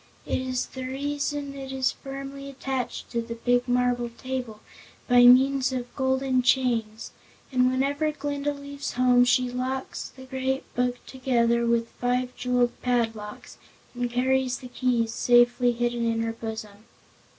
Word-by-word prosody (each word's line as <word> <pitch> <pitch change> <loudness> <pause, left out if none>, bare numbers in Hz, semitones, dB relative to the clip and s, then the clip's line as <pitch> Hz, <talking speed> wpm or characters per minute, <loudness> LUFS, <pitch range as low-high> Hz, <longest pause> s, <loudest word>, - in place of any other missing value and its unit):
That - - -4
is 255 -1 -1
the 260 - -8
reason 285 +1 -3
it 270 -1 -7
is 265 -1 +1
firmly 275 0 -8
attached 265 -2 -4
to 235 - 0
the 230 0 -6
big 245 +1 +1
marble 245 -1 +1
table 245 -2 -5 0.5
by 245 -1 +6
means 260 +1 +6
of 250 -2 -5
golden 265 -1 +1
chains, 240 -4 +1 0.4
and 255 -1 +3
whenever 280 +4 0
Glinda 290 -1 -2
leaves 280 0 -6
home 245 0 +4
she 245 0 +2
locks 260 +1 -3
the 260 0 -13
Great 265 +1 -2
Book 245 0 -1
together 235 -3 +1
with 235 0 +2
five 250 +1 -1
jeweled 245 -1 +1
padlocks, 225 -4 -2 0.3
and 245 -1 -2
carries 255 +1 +1
the 250 - -10
keys 240 -3 0
safely 240 +1 +4
hidden 240 0 -1
in 225 0 -1
her 225 0 -2
bosom. 220 -2 -7
250 Hz, 145 wpm, -26 LUFS, 240-265 Hz, 0.5 s, by